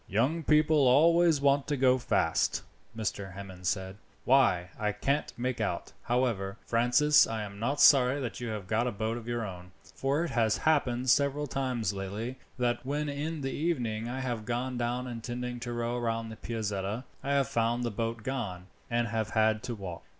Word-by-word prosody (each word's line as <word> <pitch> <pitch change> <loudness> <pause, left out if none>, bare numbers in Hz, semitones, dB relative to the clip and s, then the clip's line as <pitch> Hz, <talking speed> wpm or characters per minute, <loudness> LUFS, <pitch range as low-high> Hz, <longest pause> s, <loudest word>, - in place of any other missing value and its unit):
"Young 130 - +1
people 150 -2 +4
always 165 +4 +5
want 140 0 +3
to 145 - 0
go 130 0 +4
fast," 80 -9 +1 0.3
Mr. 100 -3 -3
Hammond 95 -2 -7
said. 95 +1 -2 0.3
"Why, 115 -10 +3
I 105 -1 0
can't 140 +8 -1
make 125 -1 -2
out. 90 -5 -3
However, 115 -6 -1
Francis, 125 +6 +4
I 110 -1 -3
am 100 -1 -8
not 135 +6 -1
sorry 135 0 +6
that 125 -4 -4
you 120 - -4
have 105 -3 -4
got 110 +5 0
a - - 0
boat 110 +2 -2
of 120 -1 -8
your 120 -1 -2
own, 90 -2 -9 0.2
for 140 +4 0
it 170 - -3
has 115 -2 +2
happened 130 -5 +2
several 140 +2 +2
times 130 -6 -1
lately, 105 +6 -5 0.2
that 120 -1 0
when 145 +3 -2
in 150 +2 -3
the 135 0 -2
evening 120 -9 -1
I 130 +2 -3
have 120 -4 -3
gone 125 +3 -2
down 120 +1 -1
intending 120 0 -5
to 120 0 -5
row 120 +1 -2
round 115 -1 -2
to - - -7
the - - -9
Piazzetta, 105 0 -2 0.2
I 140 - 0
have 140 -2 +2
found 120 +1 0
the 120 - -1
boat 115 +1 -3
gone, 105 -9 -4 0.2
and 120 0 +1
have 110 -1 -1
had 110 -1 +2
to 120 -2 -3
walk. 95 -5 -7
120 Hz, 190 wpm, -30 LUFS, 110-135 Hz, 0.3 s, sorry